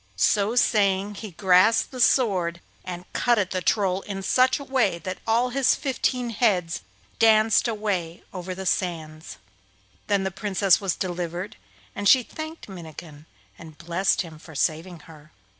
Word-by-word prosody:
So 205 - +2
saying 200 -4 +2
he 215 - -6
grasped 185 +4 +3
his 250 -2 +4
sword, 185 -9 +1 0.2
and 180 -1 -7
cut 240 -1 +2
at 195 -3 0
the 185 - -2
Troll 195 -2 +1
in 195 -1 -6
such 255 +5 +3
a 280 - -8
way 250 -10 +1
that 185 +2 -6
all 235 +3 +2
his 270 0 +3
fifteen 250 -3 -2
heads 190 -7 0 0.4
danced 220 0 +4
away 200 -7 -3
over 185 0 -6
the 190 +1 -7
sands. 160 -4 -3 0.7
Then 200 -2 +1
the 190 - -2
Princess 195 -1 +2
was 195 -3 -1
delivered, 175 +1 -4 0.4
and 205 -1 +1
she 260 -2 +6
thanked 315 +5 -8
Minnikin 160 -4 -11 0.3
and 160 -2 -12
blessed 175 +4 0
him 160 -3 -12
for 160 -1 -14
saving 165 +3 -2
her. 155 -2 -16
190 Hz, 155 wpm, -24 LUFS, 170-220 Hz, 0.7 s, she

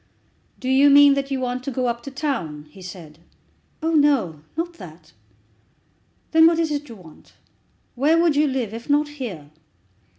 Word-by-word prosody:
"Do 255 - -6
you 270 +2 +5
mean 285 0 +7
that 275 0 -2
you 270 -1 -2
want 250 0 -3
to 275 - -4
go 255 -1 -2
up 235 -1 -2
to 275 - -8
town?" 260 - -4
he 190 - -15
said. 175 -4 -11 0.6
"Oh, 325 - +1
no; 275 - +2 0.2
not 345 +1 -3
that." 160 -3 -13 1.2
"Then 320 0 +6
what 335 0 +2
is 325 -2 0
it 295 -1 -4
you 230 - -9
want? 170 -6 -17 0.6
Where 300 +6 +2
would 335 -3 +2
you 300 +1 +3
live, 255 -6 -3
if 230 +4 -9
not 295 +1 +2
here?" 210 - -8
265 Hz, 175 wpm, -22 LUFS, 190-295 Hz, 1.2 s, mean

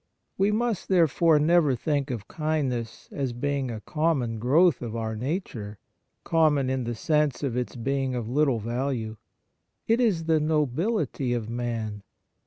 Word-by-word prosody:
We 195 +2 +2
must, 225 -1 -1
therefore, 165 -3 +4
never 150 -2 +4
think 145 +3 -1
of 115 -6 -5
kindness 140 -7 -2
as 135 -4 -2
being 140 +1 -1
a 110 -2 -5
common 145 -8 0
growth 155 +9 +4
of 115 -2 -5
our 110 -1 -3
nature, 115 - -4 0.5
common 150 -5 +2
in 130 -2 -1
the 120 0 -3
sense 150 +3 +1
of 130 -4 -1
its 125 +1 -2
being 135 +1 -1
of 120 -3 -3
little 135 0 +2
value. 115 0 -3 0.7
It 230 +2 +2
is 200 -9 +2
the 160 -1 +2
nobility 150 - 0
of 115 -2 -3
man. 115 -3 -3
135 Hz, 150 wpm, -26 LUFS, 120-160 Hz, 0.7 s, therefore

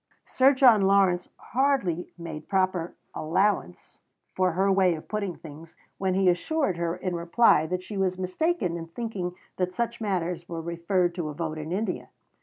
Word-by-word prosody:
Sir 265 +2 +4
John 245 -6 +6
Lawrence 190 -2 +3
hardly 240 - 0
made 160 -3 -8
proper 185 -3 0 0.2
allowance 165 - -1 0.3
for 185 -2 +1
her 195 +3 +2
way 190 -3 +3
of 155 - -10
putting 200 -5 -3
things 160 +1 -12 0.2
when 190 -1 0
he 190 0 +2
assured 190 - +1
her 170 0 -1
in 180 0 -3
reply 170 -1 +3
that 180 +2 -3
she 205 +1 -7
was 185 -1 0
mistaken 185 - -1
in 165 -1 -7
thinking 180 -2 -4 0.2
that 180 0 -1
such 235 +1 -2
matters 180 -4 -2
were 165 -1 -4
referred 170 +2 0
to 170 -4 -3
a 150 - -7
vote 155 -1 -3
in 155 +1 -6
India. 195 0 -2
180 Hz, 170 wpm, -26 LUFS, 170-200 Hz, 0.3 s, John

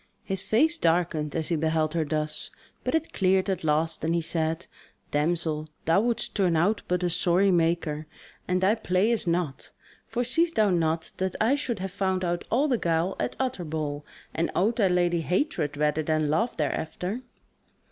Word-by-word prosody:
His 195 -1 0
face 315 +12 +2
darkened 165 - +1
as 160 0 -1
he 170 - +2
beheld 160 0 0
her 165 -1 +1
thus, 155 +1 -2 0.3
but - - 0
it 320 0 -1
cleared 190 0 +2
at 190 - -3
last, 160 +1 +1
and 165 +1 +1
he - - +2
said: 160 0 -1 0.5
"Damsel, 155 0 0 0.2
thou 165 +5 +4
wouldst 235 0 -1
turn 185 -5 +2
out 205 +6 +2
but 180 0 0
a 175 - +2
sorry 180 +3 +3
maker, 165 -3 0 0.4
and 185 0 +1
thy 190 +3 +4
play 210 -1 +1
is 225 -5 -1
naught. 170 -5 -1 0.4
For 245 - -1
seest 330 +7 +1
thou 215 -3 +4
not 165 -2 0
that 190 -1 -2
I 225 +5 +3
should 270 -5 -1
have 190 0 -4
found 190 -1 -1
out 175 0 -2
all 275 +6 +2
the 250 -5 +1
guile 170 +2 0
at - - -2
Utterbol, 155 - -2 0.3
and 165 +1 0
owed 220 +5 +2
thy 205 -5 +4
lady 175 -2 +2
hatred 170 - -1
rather 150 +1 +1
than 155 -1 0
love 225 +10 0
thereafter." 175 - -2
175 Hz, 180 wpm, -27 LUFS, 160-200 Hz, 0.5 s, thou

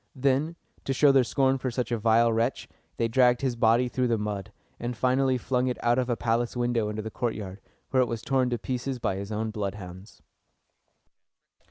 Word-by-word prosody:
Then, 140 +5 +1 0.3
to 135 - 0
show 140 +2 +5
their 135 -2 +5
scorn 135 +1 +1
for 130 - -2
such 120 -1 -3
a 120 - +1
vile 115 +1 +4
wretch, 115 +3 -1 0.3
they 115 - +1
dragged 125 +1 +3
his 130 -3 0
body 115 +2 +3
through 125 +1 0
the 115 -1 +1
mud, 105 -2 -4 0.3
and 120 0 -4
finally 130 +1 +2
flung 125 +1 0
it 125 - -1
out 120 +1 +3
of 130 0 -1
a 120 - 0
palace 120 +1 -1
window 120 -3 0
into 105 0 -4
the 110 - -6
courtyard, 105 -5 -4 0.3
where 130 - +4
it 125 - +2
was 115 -1 -4
torn 130 -1 +1
to 120 - -1
pieces 125 +3 -3
by 100 -5 -2
his 100 +2 -6
own 110 +1 -2
bloodhounds. 100 -1 -7
120 Hz, 200 wpm, -27 LUFS, 110-130 Hz, 0.3 s, show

